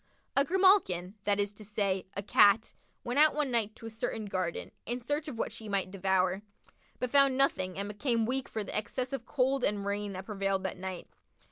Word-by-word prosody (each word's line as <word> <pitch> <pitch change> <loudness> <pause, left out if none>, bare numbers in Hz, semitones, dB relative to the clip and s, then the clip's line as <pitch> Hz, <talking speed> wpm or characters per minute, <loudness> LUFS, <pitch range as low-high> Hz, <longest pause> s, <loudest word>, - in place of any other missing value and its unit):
A 275 - +5
grimalkin, 340 - +3
that 205 -1 +2
is 205 0 0
to 215 - -8
say, 200 -3 -1
a 200 - -2
Cat, 205 +2 +5 0.3
went 245 +4 -1
out 305 -1 +6
one 300 -3 0
night 220 -2 0
to 225 - -12
a - - -4
certain 220 0 -3
garden, 185 -4 -3 0.2
in 240 +2 -2
search 290 +5 -2
of 265 -6 -6
what - - -2
she 220 -2 -8
might 195 -2 0
devour, 190 0 +1 0.6
but 250 -1 -3
found 275 -2 +5
nothing 185 -10 +1
and 200 +1 -2
became 230 +2 0
weak 260 +3 -2
for 220 - -3
the - - -6
excess 250 +5 -2
of 240 -4 -4
cold 265 -1 +1
and 200 -1 0
rain 200 0 -2
that 185 0 -6
prevailed 195 -2 -1
that 190 0 -3
night. 185 -1 -6
210 Hz, 210 wpm, -31 LUFS, 195-255 Hz, 0.6 s, out